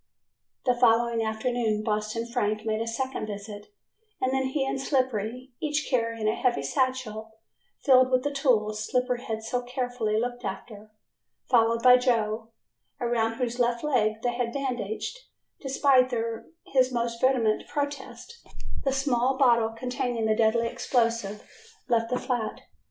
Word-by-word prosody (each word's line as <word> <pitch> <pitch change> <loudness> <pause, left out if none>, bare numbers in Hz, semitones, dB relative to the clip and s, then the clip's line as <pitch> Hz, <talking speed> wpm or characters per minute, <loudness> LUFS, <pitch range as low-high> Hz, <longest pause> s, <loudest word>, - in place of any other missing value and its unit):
The 250 - +4
following 235 -1 +3
afternoon 220 -1 -1
Boston 215 +1 -1
Frank 215 -3 -1
made 220 0 0
a 230 - -2
second 260 0 -3
visit 205 0 -7 0.5
and 260 0 0
then 265 0 +1
he 270 +1 -1
and 270 0 -2
Slippery, 255 -2 -1
each 300 -1 0
carrying 230 -3 0
a 215 - +3
heavy 240 - 0
satchel 220 - -2 0.5
filled 255 -2 +6
with 255 -1 +2
the 290 - -1
tools 215 -6 +1
Slippery 250 0 0
had 220 -3 -4
so 245 +2 -1
carefully 245 -3 -2
looked 245 +1 -3
after, 215 +1 -7 0.6
followed 230 -1 +3
by 250 0 +8
Joe, 225 -3 0 0.5
around 235 -2 0
whose 245 0 -3
left 235 -1 +1
leg 220 -7 +1
they 245 -1 +1
had 240 -1 -2
bandaged, 250 - -3 0.4
despite 265 -2 +3 0.5
his 260 -1 +2
most 235 -1 -2
vehement 245 -5 +2
protests, 290 - -5 0.4
the 270 - +1
small 265 -1 +1
bottle 235 -4 +4
containing 245 0 -2
the 215 0 +2
deadly 230 +1 +2
explosive, 230 -4 -1 0.4
left 230 -1 +1
the 250 - 0
flat. 240 -5 -3
240 Hz, 140 wpm, -27 LUFS, 220-255 Hz, 0.6 s, by